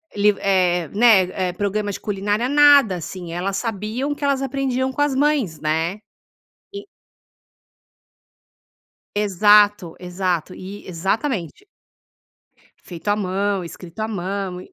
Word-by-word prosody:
liv 205 0 +3
eh, 180 -4 +1
né, 190 -4 +3
eh, 175 - -5
programas 205 +1 -2
de - - -9
culinária, 205 +3 -1
nada 285 -7 +6
assim. 175 0 -7
Elas 190 +3 -2
sabiam 230 +6 -3
que 290 - -10
elas 280 -1 +1
aprendiam 265 -1 -1
com 275 - -3
as 290 - 0
mães, 275 - +1
né? 160 +5 -1 0.8
E. 405 0 -6 2.3
Exato, 205 -2 +4
exato, 180 -1 -2
eh, 195 +2 -10
exatamente. 195 - -3 1.1
Feito 175 +1 -9
à 205 - +3
mão, 195 -1 -1
escrito 170 +3 -10
à 215 - -1
mão. 195 -2 -4
200 Hz, 120 wpm, -21 LUFS, 180-235 Hz, 2.3 s, nada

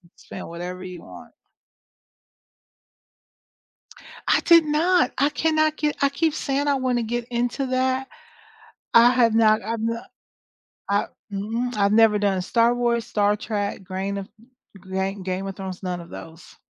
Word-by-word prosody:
Spend - - -9
whatever 180 +2 -6
you 180 -2 -8
want. - - -13 2.9
I - - +4
did 335 -2 +6
not. 315 0 +2
I 285 +2 +4
cannot 310 -1 +1
get 300 -1 -1
I 280 - +5
keep 310 +2 0
saying 280 +1 -1
I 285 - +3
want 255 -2 0
to - - -1
get 240 +1 -3
into 245 +3 -1
that. 260 +1 0 0.9
I 235 +1 +8
have 235 -3 +3
not 220 -1 +4
I've 225 +2 -3
no 230 +1 -2 0.9
I 200 0 +1 0.3
mm 225 +5 -3
i've 200 0 +2
never 220 -1 +5
done 195 -2 +1
Star 235 +4 +2
Wars, 235 -1 0
Star 205 0 +1
Trek, 205 -2 -3
Grain 195 +1 -4
of 195 - -7 0.6
Gain 190 +1 -2
Game 185 +1 -3
of 195 - -6
Thrones, 190 -1 -7
none 180 -1 -3
of 170 - -11
those. 165 +1 -11
230 Hz, 150 wpm, -23 LUFS, 195-260 Hz, 2.9 s, I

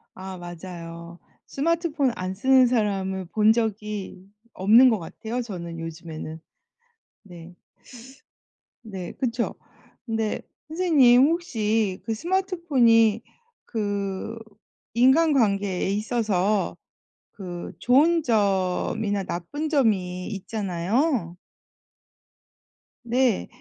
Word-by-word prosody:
아 190 0 -8
맞아요. 170 -1 -9 0.3
스마트폰 315 -3 0
안 185 0 -4
쓰는 260 +5 +4
사람을 195 -5 -1
본 215 +2 +4
적이 210 -4 -4 0.3
없는 225 +7 +6
것 220 - +1
같아요 220 +8 -5
저는 170 -7 -7
요즘에는. 160 -1 -7 0.9
네. 175 -2 -12 1.3
네 190 -6 -7
그쵸. 235 -2 -2 0.5
근데 225 -2 -2 0.3
선생님 290 -8 +5
혹시 220 - 0
그 225 - -1
스마트폰이 270 - +2 0.4
그 205 0 -3 0.6
인간관계에 235 - +3
있어서 210 -2 0 0.6
그 175 -3 -7
좋은 305 - +4
점이나 200 -1 0
나쁜 185 - -4
점이 190 - +1
있잖아요. 200 - -1 1.7
네. 240 -2 +1
215 Hz, 180 characters per minute, -24 LUFS, 185-250 Hz, 1.7 s, 없는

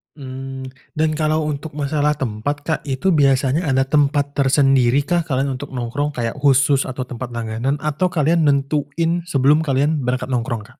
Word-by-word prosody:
Mmm, 135 -1 -7 0.2
dan 155 0 +1
kalau 155 0 0
untuk 150 0 -4
masalah 150 0 0
tempat, 130 +1 -2
Kak, 160 0 -1
itu 140 +8 0
biasanya 140 +1 +2
ada 135 -1 +3
tempat 145 +1 +1
tersendiri 135 -1 +3
kah, 170 +2 0
kalian 135 -2 -1
untuk 135 -1 -8
nongkrong 145 +5 -2
kayak 115 +2 -3
khusus 135 0 +3
atau 130 0 -4
tempat 125 -1 -7
langganan 115 +4 -2
atau 150 +4 0
kalian 165 -1 +2
nentuin 150 +4 0
sebelum 140 0 +3
kalian 145 0 +1
berangkat 125 +1 -2
nongkrong, 120 -2 -2
Kak? - - -25
140 Hz, 160 wpm, -20 LUFS, 130-150 Hz, 0.2 s, ada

